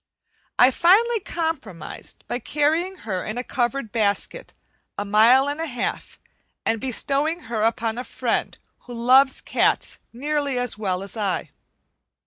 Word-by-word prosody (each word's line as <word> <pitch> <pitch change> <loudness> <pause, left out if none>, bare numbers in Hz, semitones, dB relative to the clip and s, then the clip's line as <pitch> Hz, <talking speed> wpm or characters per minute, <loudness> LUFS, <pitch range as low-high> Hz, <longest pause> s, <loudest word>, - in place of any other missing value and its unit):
I 250 +2 +7
finally 430 - +4
compromised 310 - -5
by 245 - -2
carrying 315 +8 0
her 190 -4 -2
in 215 +2 -5
a 245 - -2
covered 245 -2 -2
basket 225 - -1 0.4
a 205 - -2
mile 230 +7 +5
and 290 +2 -2
a 330 - -2
half 250 -3 -4 0.5
and 225 -1 0
bestowing 280 +6 0
her 225 -2 -3
upon 225 +1 0
a - - -3
friend - - -2 0.3
who 245 - -9
loves 260 +3 +4
cats - - +1
nearly 285 +1 -1
as 245 -2 -1
well 190 -3 -2
as 200 - -8
I. 200 -4 -2
250 Hz, 140 wpm, -23 LUFS, 220-295 Hz, 0.5 s, I